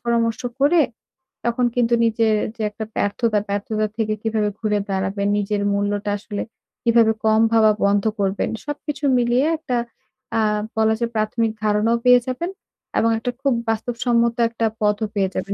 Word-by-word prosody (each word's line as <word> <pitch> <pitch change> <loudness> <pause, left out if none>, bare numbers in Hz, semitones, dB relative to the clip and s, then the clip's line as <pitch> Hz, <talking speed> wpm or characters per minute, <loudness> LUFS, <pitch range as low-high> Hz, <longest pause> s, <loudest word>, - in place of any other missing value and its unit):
পরামর্শ 230 -1 +1 0.2
করে 315 +4 +5 0.7
তখন 235 +1 +1
কিন্তু 240 -1 +2
নিজের 225 -1 +2 0.2
যে 225 - -7
একটা 220 +1 -7
ব্যর্থতা, 215 +1 +1
ব্যর্থতা 215 +2 -1
থেকে 215 -1 0
কিভাবে 220 -2 0
ঘুরে 210 -2 0
দাঁড়াবেন? 195 +1 -1
নিজের 205 0 -1
মূল্যটা 205 0 -1
আসলে 205 0 -5 0.4
কিভাবে 230 -1 +4
কম 220 0 +4
ভাবা 220 -1 +5
বন্ধ 200 0 +2 0.2
করবেন? 195 0 0 0.2
সবকিছু 295 -1 -5
মিলিয়ে 245 +3 +2
একটা 255 -6 -2 0.6
আ - - +3 0.4
বলা 220 0 +3
যায় 235 0 -1
প্রাথমিক 220 +1 0
ধারণাও 215 +2 +2
পেয়ে 250 0 +7
যাবেন। 255 +8 -2 0.5
এবং 230 - +3
একটা 245 +2 -2
খুব 275 -1 +2 0.2
বাস্তবসম্মত 235 +1 +1
একটা 230 0 -2 0.2
পথও 210 +1 +1
পেয়ে 195 -2 +1
যাবেন। 195 +2 -2
225 Hz, 150 wpm, -21 LUFS, 210-235 Hz, 0.7 s, পেয়ে